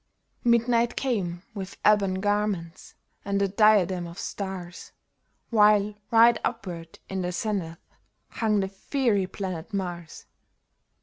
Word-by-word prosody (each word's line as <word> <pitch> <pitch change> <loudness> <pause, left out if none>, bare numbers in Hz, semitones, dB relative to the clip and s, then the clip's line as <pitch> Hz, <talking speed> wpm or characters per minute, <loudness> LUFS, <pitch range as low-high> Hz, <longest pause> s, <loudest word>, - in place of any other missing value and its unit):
Midnight 235 0 +3
came 190 -9 -2
with 195 -2 -7
ebon 200 -3 +4
garments 205 -4 -2 0.3
and 200 0 -1
a 200 - +2
diadem 190 -3 +3
of 170 +1 -11
stars. 190 -4 -6 0.6
While 210 -1 +4 0.2
right 230 0 +6
upward 175 -8 -5
in 190 -1 -3
the 180 0 -2
zenith 180 -4 -3 0.5
hung 215 -3 0
the 190 - -1
fiery 205 0 0
planet 190 0 -5
Mars. 175 -4 -5
200 Hz, 115 wpm, -26 LUFS, 180-215 Hz, 0.6 s, right